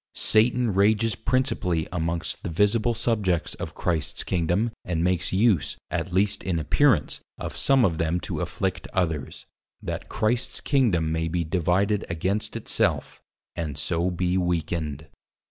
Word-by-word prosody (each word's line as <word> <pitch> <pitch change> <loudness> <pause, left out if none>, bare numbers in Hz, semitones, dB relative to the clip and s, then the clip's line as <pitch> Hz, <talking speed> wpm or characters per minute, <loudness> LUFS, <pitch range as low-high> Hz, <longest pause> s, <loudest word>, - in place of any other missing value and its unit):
Satan 115 0 +3
Rages 105 +3 +3
Principally 110 - 0
amongst 85 -1 -2
the - - -4
Visible 105 +6 +2
Subjects 100 -9 0
of - - -6
Christ's 80 -4 -1
Kingdom 90 +6 0
and 85 -2 -1
makes 90 -1 +1
use 95 -8 +2
(at 90 - -2
least 100 +3 +1
in 90 -3 -1
appearance) 75 -3 +2 0.2
of - - -6
some 135 -3 +4
of 85 -5 0
them 80 +2 +1
to - - -4
Afflict - - -2
others; 80 -8 -2 0.3
that - - -5
Christ's 120 +3 -1
Kingdom, 100 - +2
may 80 0 0
be 85 +1 -1
divided 90 +5 +1
against 95 +5 -2
it - - -6
self, - - 0 0.3
and 75 -4 -4
so 85 +4 0
be 90 +1 0
weakened. 80 -4 -2
90 Hz, 145 wpm, -25 LUFS, 80-105 Hz, 0.3 s, some